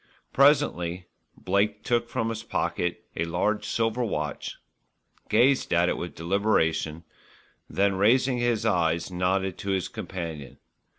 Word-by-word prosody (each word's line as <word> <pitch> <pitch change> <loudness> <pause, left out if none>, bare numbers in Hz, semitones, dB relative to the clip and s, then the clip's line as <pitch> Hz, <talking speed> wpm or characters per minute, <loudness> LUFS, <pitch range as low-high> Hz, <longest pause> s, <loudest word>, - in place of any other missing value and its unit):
Presently 110 - +3 0.3
Blake 105 +2 0
took 120 -1 0
from 115 - -1
his 110 -1 -4
pocket 90 -5 -2
a 85 - 0
large 90 +6 -1
silver 115 +2 0
watch, 75 -10 -3 0.7
gazed 130 +5 +3
at 85 +1 +3
it - - 0
with 85 - -6
deliberation, 85 -3 0 0.7
then 100 0 +2
raising 125 +6 +3
his 120 -2 0
eyes 85 +1 +1
nodded 95 +1 0
to 100 - -5
his 95 -3 0
companion. 80 -6 -6
95 Hz, 125 wpm, -26 LUFS, 85-115 Hz, 0.7 s, Presently